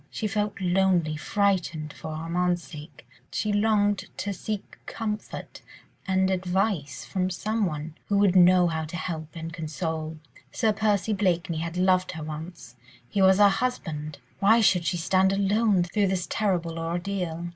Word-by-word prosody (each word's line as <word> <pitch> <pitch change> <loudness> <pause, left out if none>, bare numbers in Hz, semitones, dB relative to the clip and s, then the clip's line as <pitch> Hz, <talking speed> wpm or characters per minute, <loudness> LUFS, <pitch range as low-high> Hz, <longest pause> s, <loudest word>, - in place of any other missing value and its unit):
She 220 - -4
felt 210 -1 -1
lonely, 180 -4 +2
frightened 170 -3 0
for - - -9
Armand's 175 +2 -1
sake; 150 -2 -11 0.2
she 210 -1 -1
longed 205 -1 +2
to 200 +1 -2
seek 210 +2 -6
comfort 215 -2 -5 0.5
and 190 0 +2
advice 185 - -1
from 185 -1 -1
someone 180 -6 -2
who 200 - +1
would 200 -2 +4
know 180 0 +6
how 160 -2 -1
to 165 +3 -6
help 160 -4 -4
and 165 0 -6
console. 160 -1 -4 0.3
Sir 220 -3 +1
Percy 210 0 +1
Blakeney 175 -5 0
had 165 +2 -4
loved 185 0 +2
her 160 -2 -6
once; 155 -5 -8 0.3
he 195 - 0
was 190 0 +6
her 205 0 +7
husband; 165 -9 -3 0.2
why 215 +4 +5
should 180 -6 +3
she 175 - 0
stand 190 +3 +2
alone 200 -1 +2
through 200 +3 +1
this 185 -2 -1
terrible 175 -6 -1
ordeal? 175 0 -3
185 Hz, 150 wpm, -26 LUFS, 165-200 Hz, 0.5 s, her